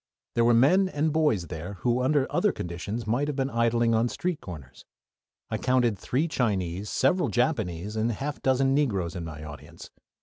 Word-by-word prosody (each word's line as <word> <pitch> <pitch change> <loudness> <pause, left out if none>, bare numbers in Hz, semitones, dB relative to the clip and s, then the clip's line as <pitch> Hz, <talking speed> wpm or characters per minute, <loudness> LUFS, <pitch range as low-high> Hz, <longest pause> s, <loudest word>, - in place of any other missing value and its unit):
There 115 - +2
were 120 0 +5
men 185 +11 +4
and 155 -1 0
boys 150 - +2
there 85 +3 -6
who 120 +1 +1
under 135 +1 +2
other - - +3
conditions 90 +7 -5
might 120 +7 0
have 150 - -2
been 135 0 -1
idling 115 0 +2
on 115 +2 +2
street 180 +3 -3
corners. 70 -9 -10 0.7
I - - -1
counted 125 -5 +1
three 140 - 0
Chinese, 100 - -1
several 135 - +2
Japanese, 105 - -1
and 110 +1 0
a 115 - -2
half 145 +4 -5
dozen 135 0 +2
Negroes 100 - 0
in 90 - -4
my 80 -2 -7
audience. 75 -2 -11
115 Hz, 180 wpm, -27 LUFS, 95-135 Hz, 0.7 s, were